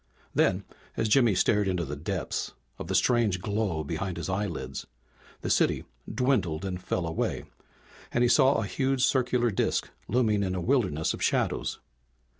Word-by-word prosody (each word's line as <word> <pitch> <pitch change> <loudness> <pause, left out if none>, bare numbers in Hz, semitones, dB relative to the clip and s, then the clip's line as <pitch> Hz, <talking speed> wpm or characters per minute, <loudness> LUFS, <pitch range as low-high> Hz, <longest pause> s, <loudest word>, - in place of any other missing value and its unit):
Then - - +2 0.3
as 110 - +1
Jimmy 115 -2 +4
stared 105 +2 +3
into 90 -3 0
the 75 +1 -5
depths 85 +4 -3 0.3
of - - -5
the 95 - -1
strange 105 -1 +3
glow 100 -5 -1
behind 85 +4 -3
his 85 - -4
eyelids 100 +2 -3 0.5
the - - -3
city - - +2 0.3
dwindled 105 - 0
and 90 -1 -4
fell 90 -1 -2
away, 80 0 -2 0.7
and 120 - +2
he - - +5
saw 135 +2 +5
a 110 - 0
huge 135 +3 +1
circular 125 -2 +2
disk 95 - 0 0.2
looming 110 -3 +2
in 95 -2 -1
a - - -1
wilderness 90 - +1
of - - -7
shadows. - - 0
100 Hz, 160 wpm, -28 LUFS, 90-120 Hz, 0.7 s, he